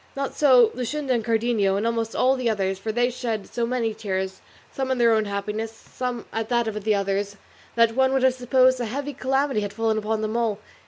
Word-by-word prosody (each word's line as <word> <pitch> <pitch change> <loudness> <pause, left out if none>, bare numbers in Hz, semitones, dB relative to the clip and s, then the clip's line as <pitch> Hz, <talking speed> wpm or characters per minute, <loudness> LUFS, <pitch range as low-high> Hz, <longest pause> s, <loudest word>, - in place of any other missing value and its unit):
Not 275 0 -3
so 250 -6 +5
Luscinda, 260 +2 -2
and 235 -2 0
Cardenio, 225 -3 +1
and 210 - -1
almost 230 -1 -1
all 260 +1 +3
the 255 -3 0
others, 195 -3 -1
for 220 +3 -3
they 245 +2 +1
shed 230 -4 -3
so 235 -1 -2
many 235 -3 -1
tears, 190 -3 -4 0.3
some 265 -1 -3
in 260 - +1
their 235 -1 +4
own 220 -1 +2
happiness, 210 +2 -3
some 245 +1 -6
at 225 0 -3
that 235 -2 +1
of 210 -1 -4
the 215 0 +2
others, 200 0 -2 0.4
that 230 -1 +4
one 265 +2 +3
would 265 -1 +1
have 260 -1 +5
supposed 255 0 +3
a 240 - -1
heavy 280 +6 -4
calamity 270 -2 0
had 205 -1 -4
fallen 225 -1 0
upon 215 +1 -2
them 215 +1 -2
all. 230 -3 0
230 Hz, 220 wpm, -24 LUFS, 215-255 Hz, 0.4 s, so